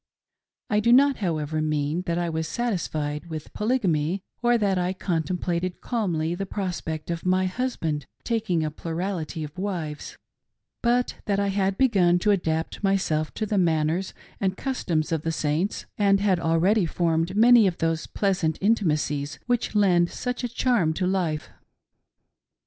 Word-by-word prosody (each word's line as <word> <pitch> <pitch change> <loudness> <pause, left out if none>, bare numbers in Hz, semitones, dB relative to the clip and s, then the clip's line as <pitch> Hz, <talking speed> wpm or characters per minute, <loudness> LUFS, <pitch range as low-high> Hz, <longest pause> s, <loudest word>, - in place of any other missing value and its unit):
I 210 - +3
do 235 +3 +3
not, 275 +2 +6
however, 155 -5 -1
mean 155 +2 0
that 170 0 0
I 175 0 0
was 160 -1 -2
satisfied 155 -9 -2
with 155 -2 -7
Polygamy 190 - 0 0.2
or 240 0 +4
that 200 -4 +1
I 180 +1 0
contemplated 175 0 -2
calmly 175 -9 -1
the 195 +2 -4
prospect 175 -5 -4
of 170 -1 -4
my 185 0 +2
husband 180 - -2 0.2
taking 210 -8 0
a 155 - -2
plurality 165 0 -4
of 150 0 -8
wives; 170 -7 -4 0.6
but 245 +1 +1
that 200 -1 +1
I 200 0 +1
had 195 0 0
begun 190 -9 +4
to 210 +4 +2
adapt 160 -2 -1
myself 185 -6 +1
to 215 - -1
the 205 -1 0
manners 165 +1 +1 0.2
and 190 -1 0
customs 170 - -1
of 160 -2 0
the 165 - -1
Saints, 155 +5 -1
and 200 -1 +4
had 195 -3 +2
already 170 +4 +2
formed 165 +2 0
many 230 0 +7
of 180 - -1
those 165 -1 -1
pleasant 185 -6 0
intimacies 150 -8 0
which 245 -3 -1
lend 180 -4 +4
such 250 0 -4
a 245 - -1
charm 230 -9 +1
to 185 - -1
life. 175 -5 -1
180 Hz, 155 wpm, -25 LUFS, 160-205 Hz, 0.6 s, many